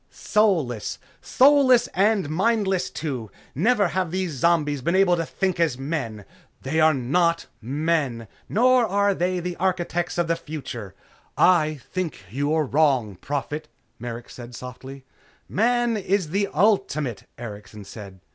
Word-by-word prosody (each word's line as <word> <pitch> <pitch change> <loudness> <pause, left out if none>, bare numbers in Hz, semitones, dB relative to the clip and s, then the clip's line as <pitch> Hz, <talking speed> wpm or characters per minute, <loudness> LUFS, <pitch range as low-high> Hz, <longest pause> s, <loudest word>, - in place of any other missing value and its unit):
"Soulless! 165 - 0 0.2
Soulless 265 -2 +5
and 200 -2 +2
mindless, 195 +2 +1
too. 130 -9 -5 0.2
Never 200 - +2
have 185 -1 -1
these 185 0 -2
zombies 150 -1 +1
been 170 +7 0
able 190 -2 +4
to 165 -2 -3
think 190 -2 -1
as 160 -7 +1
men!" 135 -8 -4 0.4
"They 150 +4 -1
are 155 -1 +5
not 165 +6 +1 0.2
men." 140 -2 -1 0.2
"Nor 250 +3 +4
are 200 0 +2
they 180 0 -1
the 175 0 -4
architects 175 -2 -1
of 175 -1 +1
the 165 - +1
future!" 135 - -7 0.4
"I 155 -5 +3
think 175 - -3
you 140 +5 -1
are 155 -1 +2
wrong, 135 -8 +2
Prophet," 145 - -4 0.3
Merrick 120 0 -7
said 120 -1 -10
softly. 130 +2 -9 0.4
"Man 240 +2 +1
is 195 -5 -1
the 200 +2 +1
ultimate," 155 - 0
Erikson 105 -2 -9
said. 100 -2 -11
160 Hz, 135 wpm, -24 LUFS, 130-190 Hz, 0.4 s, Soulless